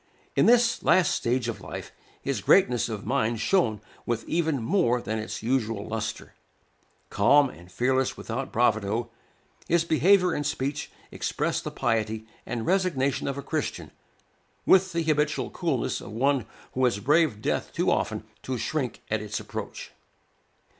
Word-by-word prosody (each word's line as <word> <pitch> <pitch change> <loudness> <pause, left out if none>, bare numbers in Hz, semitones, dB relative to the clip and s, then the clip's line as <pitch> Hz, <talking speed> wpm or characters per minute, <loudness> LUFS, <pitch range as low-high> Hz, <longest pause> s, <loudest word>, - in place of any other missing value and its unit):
In - - +4
this 240 0 +4
last 180 -2 +4
stage 120 0 0
of 115 - -4
life, - - -7 0.3
his 135 -7 -1
greatness 125 - +4
of 110 -1 -5
mind 115 -2 0
shone 110 - +2 0.2
with 115 -1 -3
even 160 -4 0
more 120 - +2
than 110 -2 -3
its 110 - -5
usual 115 -4 -1
lustre. 110 0 -4 0.8
Calm, 140 +7 +4
and 90 +2 -15
fearless 130 +5 +1
without 125 +4 -4
bravado, 115 0 +1 0.6
his 170 0 +2
behavior 180 +2 +4
and 145 - -1
speech 145 0 -2 0.2
expressed - - -2
the - - -3
piety 110 -1 -1 0.2
and 115 -1 -3
resignation 170 -8 +1
of 140 0 -2
a 140 - -5
Christian, - - -3 0.7
with 190 0 +5
the 170 -1 0
habitual 150 -1 0
coolness - - -1
of - - -9
one 130 +2 +1 0.3
who 130 - 0
has 120 -4 +2
braved 145 0 +2
death - - -1
too - - +1
often - - -1 0.2
to 130 -1 -3
shrink 125 +2 -3
at 110 -1 +1
its 105 0 -4
approach. - - -7
130 Hz, 150 wpm, -26 LUFS, 110-150 Hz, 0.8 s, with